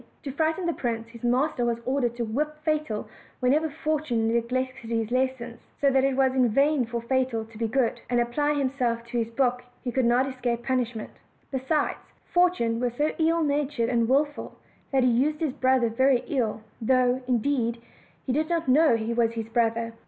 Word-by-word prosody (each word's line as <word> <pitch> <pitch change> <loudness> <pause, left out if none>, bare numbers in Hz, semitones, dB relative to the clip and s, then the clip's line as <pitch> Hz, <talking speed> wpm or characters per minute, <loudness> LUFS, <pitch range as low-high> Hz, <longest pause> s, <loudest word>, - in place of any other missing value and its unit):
To 280 - -4
frighten 320 +5 0
the 340 - +1
prince, 230 -4 -3
his 230 -1 -13
master 250 +2 +1
was 235 -1 0
ordered 255 -3 0
to 240 -1 -2
whip 295 +8 -2
Fatal 305 -9 -1 0.3
whenever 295 +6 +2
Fortune 300 -7 -1
neglected 235 +1 -1
his 225 -1 -1
lesson; 255 -2 -1 0.2
so 280 -1 +3
that 265 0 +3
it 270 -1 +2
was 265 -1 +3
in 255 -2 +3
vain 275 +1 +2
for 235 -1 -4
Fatal 255 -2 0
to 225 0 -15
be 230 - 0
good, 245 0 0
and 245 -1 +2
apply 290 +5 +1
himself 255 -4 -1
to 235 0 -2
his 225 -1 -1
book 250 0 +1 0.2
he 250 - -2
could 260 0 +1
not 245 +3 +3
escape 245 -3 -2
punish 250 -3 -1
ment: 215 - -6 0.4
besides, 270 +3 0 0.3
Fortune 350 -11 +2
was 245 -1 -1
so 300 +1 +1
ill 330 +1 +2
natured 285 -5 0
and 235 -2 +1
willful 290 +2 0 0.3
that 265 -2 +3
he 250 - +4
used 290 +6 +1
his 310 -5 -1
brother 260 -2 +2
very 255 +2 +2
ill, 225 -6 -1 0.2
though, 255 +2 +2
indeed, 240 -1 0 0.5
he 255 - -1
did 310 +3 0
not 335 -2 -1
know 290 0 +5
he 225 +1 -2
was 230 -1 +1
his 225 -1 -5
brother. 230 0 0
255 Hz, 190 wpm, -26 LUFS, 235-280 Hz, 0.5 s, know